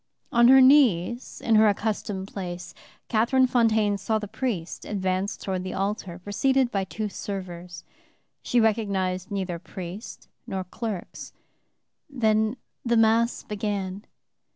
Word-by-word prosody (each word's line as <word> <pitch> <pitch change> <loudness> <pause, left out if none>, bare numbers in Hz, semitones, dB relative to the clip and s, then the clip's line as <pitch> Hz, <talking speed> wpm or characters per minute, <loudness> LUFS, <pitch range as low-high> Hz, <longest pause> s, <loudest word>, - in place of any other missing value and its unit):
On 235 0 +6
her 265 +1 +8
knees, 245 - +4
in 230 - +3
her 215 0 +6
accustomed 205 -2 -2
place, 180 -2 -6 0.3
Catherine 245 +4 +3
Fontaine 220 -5 +2
saw 220 +3 0
the 210 -1 -5
priest 215 -6 -4
advance 190 0 -2
toward 185 -2 -3
the 185 - -5
altar, 195 -3 -3
preceded 245 +7 +1
by 195 -3 -1
two 215 +3 -4
servers. 180 -4 -7 0.6
She 245 - +1
recognized 200 -4 0
neither 190 -4 -3
priest 185 +5 -8 0.2
nor 190 -1 -3
clerks. 200 +1 -6 0.8
The 220 -3 +1 0.3
Mass 230 0 +3
began. 205 -2 -4
210 Hz, 120 wpm, -26 LUFS, 190-230 Hz, 0.8 s, her